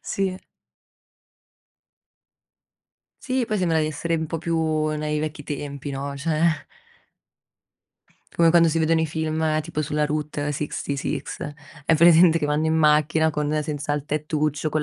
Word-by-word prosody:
Sì. 190 -1 -2 2.9
Sì, 255 -1 0
poi 215 - -1
sembra 170 -4 +1
di 155 - +1
essere 165 +2 -2
un 160 0 -2
po' 165 - -3
più 160 -2 0
nei 150 0 -2
vecchi 155 -1 -5
tempi, 140 -1 -5
no, 140 +1 -4
cioè 155 +1 0 1.7
come 170 -1 +4
quando 170 0 +5
si 165 - 0
vedono 160 0 +2
i 160 - 0
film 155 0 -1
tipo 155 -1 -3
sulla 150 0 0
Route 150 -1 -2
66, 140 -1 -3 0.6
hai 165 - +3
presente 170 +1 +6
che 150 - -1
vanno 150 +1 0
in 160 - +1
macchina 155 0 +3
con 150 0 -1
senza 150 -1 -3
il 145 0 -3
tettuccio, 150 0 -1
con 155 - 0
155 Hz, 140 wpm, -23 LUFS, 150-160 Hz, 2.9 s, presente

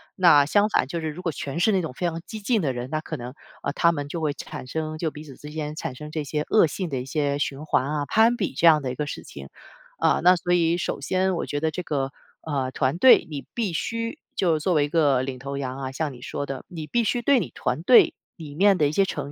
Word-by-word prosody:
那 165 -6 +6
相 205 +7 +3
反 135 - +1
就 170 +5 -3
是 160 -1 -3
如 155 +4 -7
果 175 - -1
全 140 +1 -5
是 195 +5 +3
那 190 -2 +2
种 160 -6 -5
非 175 +6 -2
常 165 0 -4
激 220 - -7
进 220 +2 +1
的 135 -6 0
人， 125 +1 -5
那 155 0 -1
可 - - -6
能， 125 +2 -8 0.3
呃， - - -1
他 170 +1 +3
们 145 -3 -4
就 165 +4 -5
会 150 -2 0
产 - - -8
生 155 +2 -4
就 160 -1 -2
彼 150 - -10
此 140 -4 -12
之 150 - -10
间 150 -1 -4
产 155 -4 -5
生 150 +3 -8
这 155 -1 -3
些 150 +1 -2
恶 215 - +5
性 180 +3 -4
的 135 -4 -2
一 125 - -5
些 140 0 -1
循 145 +1 -3
环 135 -3 +1
啊、 150 0 -2
攀 225 +2 +4
比 195 -10 -2
这 165 - +1
样 155 -2 +6
的 130 - -3
一 - - -6
个 150 - -2
事 - - -6
情。 - - -10 0.5
嗯， - - +2
那 180 +1 +7
所 175 0 -1
以 170 -1 +3
首 175 - -3
先 185 0 0
我 - - -2
觉 145 - -3
得 160 +1 0
这 180 +4 -5
个， 135 -4 -2 0.3
呃， 135 -4 -2
团 135 +3 0
队 255 +7 +6
你 145 -3 -6
必 215 -7 -2
须 230 +7 -3 0.2
就 165 -4 +2
作 180 +4 0
为 145 -1 +3
一 - - -6
个 145 -5 +3
领 130 -1 -4
头 140 +2 -5
羊 130 -1 -4
啊， 135 -1 -4
像 145 +2 -2
你 120 - -13
说 145 - -4
的， 135 -1 -6
你 160 -4 -7
必 240 +6 +1
须 240 +3 0
对 270 +2 +4
你 - - -4
团 160 - -2
队 240 +6 +6 0.2
里 150 -4 -10
面 195 +3 +4
的 150 - +3
一 - - -1
些 195 +5 +3
成 145 -6 -5
155 Hz, 300 characters per minute, -24 LUFS, 140-180 Hz, 0.5 s, 那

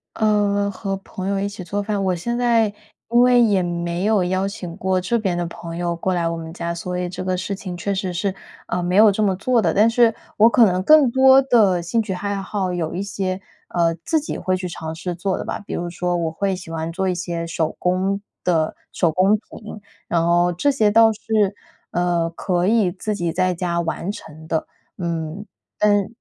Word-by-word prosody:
呃， 205 -2 +1
和 195 0 -3
朋 190 -1 -7
友 200 0 0
一 200 - 0
起 200 -1 -9
做 205 +3 -2
饭， 205 -1 -1
我 185 -1 +1
现 235 +8 -3
在 235 -2 +3 0.4
因 235 +1 +4
为 245 0 +6
也 205 -5 +3
没 175 +1 -2
有 210 -3 +3
邀 185 +2 0
请 180 -4 -7
过 190 0 0
这 230 +6 0
边 190 -5 -1
的 175 - -1
朋 165 0 -8
友 175 0 -1
过 175 +2 -1
来 175 -1 0
我 165 - -3
们 160 0 -7
家， 170 -1 -3
所 180 +1 -4
以 180 0 -2
这 180 - -6
个 185 0 0
事 185 +2 -3
情 190 -2 -6
确 200 +4 -2
实 190 -2 -2
是， 190 +2 -1 0.3
呃， 180 - -1
没 175 +1 -1
有 210 +1 +7
这 200 - -2
么 195 -3 +2
做 235 +5 +1
的。 - - +1
但 215 +3 +5
是 230 -1 +3 0.2
我 220 +2 +7
可 235 0 +6
能 180 +1 0
更 295 +1 +6
多 265 +1 +6
的 215 -9 +3
兴 225 +7 0
趣 210 -3 -3
爱 200 +2 -3
好， 190 -1 -2
有 170 -2 -3
一 190 - -2
些， 195 -1 -3 0.3
呃， 170 -1 +1
自 320 -2 +1
己 295 - -5
会 185 0 0
去 185 -1 -4
尝 160 -1 -6
试 175 +2 -4
做 185 +2 -2
的 - - -4
吧， - - -4
比 205 - -8
如 175 0 -3
说 175 +1 -2
我 165 -2 -1
会 195 +4 -1
喜 180 -2 -9
欢 160 0 -3
做 190 +1 -1
一 - - +1
些 170 -1 -3
手 165 -1 -2
工 190 +2 0 0.2
的 160 -3 +1 0.2
手 170 - +2
工 185 +5 +3
品， 215 0 -9 0.3
然 165 -1 +1
后 175 +1 +3
这 285 - +2
些 220 -6 +3
倒 225 +1 +6
是， 215 - -8 0.7
呃， 175 -1 +1
可 175 +1 -1
以 215 -3 +3
自 200 +4 -4
己 175 -4 -2
在 185 0 +1
家 170 -1 -1
完 170 +2 -3
成 160 -4 -11
的， 160 - -1 0.3
嗯。 170 +2 -4 0.3
但 205 -2 +3
185 Hz, 240 characters per minute, -21 LUFS, 175-205 Hz, 0.7 s, 有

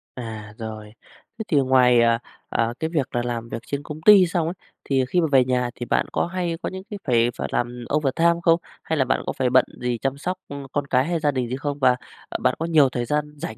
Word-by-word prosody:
À, 110 -4 -7
rồi. 110 -1 -7 0.4
Thế 220 - -3
thì 150 - +2
ngoài, 130 -3 +5
à, 115 0 +3 0.3
à, 115 0 0
cái 160 0 -1
việc 140 -6 -1
là 120 - +2
làm 115 -1 -4
việc 115 - -5
trên 140 0 -3
công 155 +1 -8
ty 200 -1 +8
xong 165 -2 0
ấy, 170 - -2 0.3
thì 135 -2 +1
khi 180 - +2
mà 160 - +2
về 130 -2 +5
nhà 125 -1 0
thì 120 - -5
bạn - - +1
có - - 0
hay 175 -2 -2
có - - -2
những 190 0 -7
cái 205 -3 -6
phải 120 -1 +3
phải - - -3
làm 120 0 -2
overtime 165 +4 +2
không? 165 0 +4 0.2
Hay 160 - -1
là 130 - +2
bạn 130 - 0
có - - -2
phải 130 -2 0
bận 130 +1 +5 0.2
gì 125 -1 -1
chăm 135 +3 -2
sóc, 180 +5 -3
ưm, 140 -1 -7
con 145 -1 -2
cái 130 +1 +2
hay 170 0 -1
gia 150 -1 +2
đình 125 -3 -2
gì 130 - -2
không? 145 +1 -4
Và, 130 -2 +4 0.3
ờ, - - -2
bạn - - +3
có 165 - -1
nhiều 155 -5 +4
thời 120 -1 -3
gian 150 +3 -1
rảnh 170 +4 -6
135 Hz, 260 wpm, -23 LUFS, 120-160 Hz, 0.4 s, ty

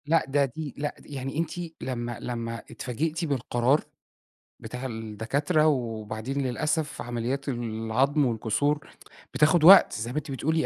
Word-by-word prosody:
لأ، 165 +3 +3
ده 140 +1 +3
دي 145 +2 -6
لأ، 145 0 -3
د - - -18
يعني 135 0 -5
أنتِ 165 0 -1 0.3
لمّا 120 -2 -3
لمّا 115 -1 -4
اتفاجئتِ 155 +6 -2
بالقرار 130 -1 +1 0.8
بتاع 125 +1 -6
الدكاترة 115 - 0
وبعدين 115 -1 -2
للأسف، 145 +3 -1
عمليات 120 +4 -3
العضم 120 +4 0
والكسور 125 +6 0 0.5
بتاخد 155 +2 +4
وقت 190 +4 +9
زي 115 +3 -3
ما 140 - -4
أنتِ 150 -1 -3
بتقولي 160 +4 0
135 Hz, 135 wpm, -27 LUFS, 120-150 Hz, 0.8 s, وقت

